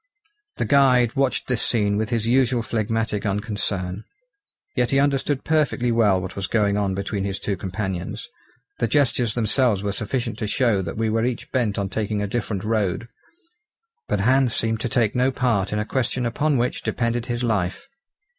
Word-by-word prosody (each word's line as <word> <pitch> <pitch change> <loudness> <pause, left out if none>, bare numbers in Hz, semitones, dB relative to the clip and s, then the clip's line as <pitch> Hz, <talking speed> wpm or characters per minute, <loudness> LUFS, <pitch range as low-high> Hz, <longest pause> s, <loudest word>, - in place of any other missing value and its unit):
The - - -1
guide 130 -4 +4
watched 135 -3 +1
this 125 -3 0
scene 105 -3 +1
with 110 +1 -1
his 115 -3 0
usual 125 0 +2
phlegmatic 110 -2 -1
unconcern. 100 -2 -2 0.7
Yet - - +1
he 135 - +3
understood 140 0 +1
perfectly 150 -6 +1
well 105 -5 +3
what 90 0 -6
was 100 -1 -3
going 105 -3 +2
on 100 -2 0
between 100 0 -2
his 100 0 -2
two 100 0 -2
companions. 95 -1 -4 0.5
The 115 - +1
gestures 120 -3 +2
themselves 115 -2 +2
were 100 - -1
sufficient 115 +2 -2
to 110 - -2
show 110 -2 +2
that 85 +1 -5
we 110 0 0
were 115 +1 +1
each 125 0 -3
bent 120 -6 0
on 100 -1 -1
taking 105 +1 -2
a 105 - -1
different 105 -2 -3
road; 110 0 -1 1.0
but 100 - 0
Hans 130 +2 +3
seemed 115 -1 0
to 120 - -2
take 115 -3 +2
no 125 +1 +3
part 120 -7 0
in 105 - -1
a 105 - -1
question 130 +1 -1
upon 145 +5 +1
which 120 +1 -1
depended 115 0 -1
his 120 0 -2
life. 105 - -1
115 Hz, 180 wpm, -23 LUFS, 100-125 Hz, 1.0 s, guide